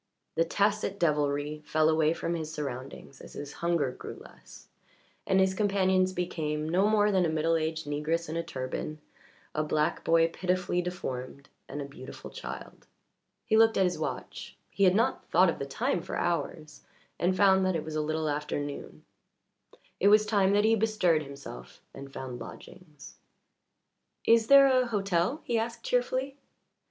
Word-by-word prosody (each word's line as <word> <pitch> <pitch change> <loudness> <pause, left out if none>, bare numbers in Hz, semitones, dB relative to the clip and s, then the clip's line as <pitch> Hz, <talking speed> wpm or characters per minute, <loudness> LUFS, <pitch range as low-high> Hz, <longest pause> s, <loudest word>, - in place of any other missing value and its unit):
The 165 - +2
tacit 200 +2 0
devilry 150 -1 0
fell 155 +1 +2
away 155 -1 +3
from 170 - -3
his 160 -2 -4
surroundings 135 -2 -7
as - - -12
his 145 0 -7
hunger 170 -6 +1
grew - - -9
less, - - -15 0.6
and 190 - +3
his 190 0 +3
companions 190 -2 +2
became 155 -4 -2
no 185 +5 +2
more 210 -1 +3
than 190 -2 +3
a 170 - +1
middle 160 +1 +1
aged 160 0 -2
negress 155 +3 -1
in 155 - -5
a 170 - 0
turban, 145 0 -5 0.6
a 155 - 0
black 150 0 0
boy 165 0 +4
pitifully 180 0 -1
deformed, 140 -6 -6 0.2
and 145 - -4
a - - -6
beautiful 140 -2 -10
child. - - -9 0.6
He 220 - +2
looked 225 0 +5
at 190 - +4
his 180 -1 0
watch - - -5
he 200 - +2
had 185 0 +5
not 230 +4 0
thought 180 +1 +5
of - - -8
the 140 - -4
time 170 +5 -1
for - - -6
hours 155 -3 -3 0.4
and 185 +2 +1
found 190 0 +5
that 185 - 0
it 160 - -3
was 155 -1 -6
a 155 - +1
little 155 +1 -1
after 150 0 -2
noon. 145 0 -7 0.9
It 200 - +3
was 210 +1 +6
time 200 -2 +2
that 205 +1 +3
he 225 - +4
bestirred 210 -7 +2
himself 140 - -10
and 135 0 -10
found 130 -2 -6
lodgings. 150 +5 -12 1.1
"Is 230 -1 +4
there 275 +1 +8
a 255 -2 +3
hotel?" 195 - 0
he 235 -1 0
asked 230 +1 -4
cheerfully. 255 +2 -1
170 Hz, 170 wpm, -29 LUFS, 150-200 Hz, 1.1 s, there